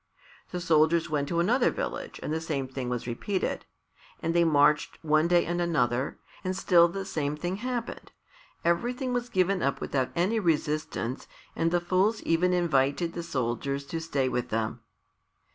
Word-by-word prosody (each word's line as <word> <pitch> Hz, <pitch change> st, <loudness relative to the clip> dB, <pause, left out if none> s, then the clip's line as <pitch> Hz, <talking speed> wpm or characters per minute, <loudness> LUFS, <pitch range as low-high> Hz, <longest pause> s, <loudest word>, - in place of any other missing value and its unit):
The 180 Hz, -, -4 dB
soldiers 165 Hz, -1 st, +3 dB
went 145 Hz, -2 st, 0 dB
to 170 Hz, -, 0 dB
another 240 Hz, +9 st, +3 dB
village -, -, -4 dB
and 155 Hz, -, -2 dB
the 160 Hz, -, -1 dB
same 145 Hz, -5 st, -2 dB
thing 130 Hz, -1 st, -4 dB
was 125 Hz, -1 st, -3 dB
repeated. 180 Hz, -, -2 dB, 0.5 s
And 165 Hz, -, -1 dB
they 170 Hz, 0 st, +4 dB
marched 150 Hz, -1 st, +3 dB
one 155 Hz, +1 st, +3 dB
day 175 Hz, 0 st, +4 dB
and 175 Hz, +1 st, -1 dB
another, 130 Hz, -6 st, 0 dB, 0.3 s
and 185 Hz, 0 st, -2 dB
still 175 Hz, -3 st, +5 dB
the 195 Hz, +3 st, -5 dB
same 150 Hz, -5 st, -2 dB
thing 175 Hz, +4 st, -3 dB
happened. 245 Hz, +1 st, -4 dB, 0.5 s
Everything 245 Hz, +9 st, 0 dB
was 245 Hz, 0 st, -2 dB
given 185 Hz, -2 st, +1 dB
up 140 Hz, -, 0 dB
without 130 Hz, -2 st, -1 dB
any 190 Hz, +7 st, +1 dB
resistance 155 Hz, -, -1 dB, 0.3 s
and 165 Hz, -, +1 dB
the 175 Hz, +1 st, +2 dB
fools 185 Hz, +5 st, +1 dB
even 170 Hz, +2 st, +2 dB
invited 165 Hz, -1 st, +1 dB
the 170 Hz, -, -4 dB
soldiers 140 Hz, 0 st, -2 dB
to 165 Hz, -, -1 dB
stay 140 Hz, -5 st, 0 dB
with 125 Hz, -1 st, -2 dB
them. 110 Hz, 0 st, -2 dB
165 Hz, 165 wpm, -28 LUFS, 140-180 Hz, 0.5 s, still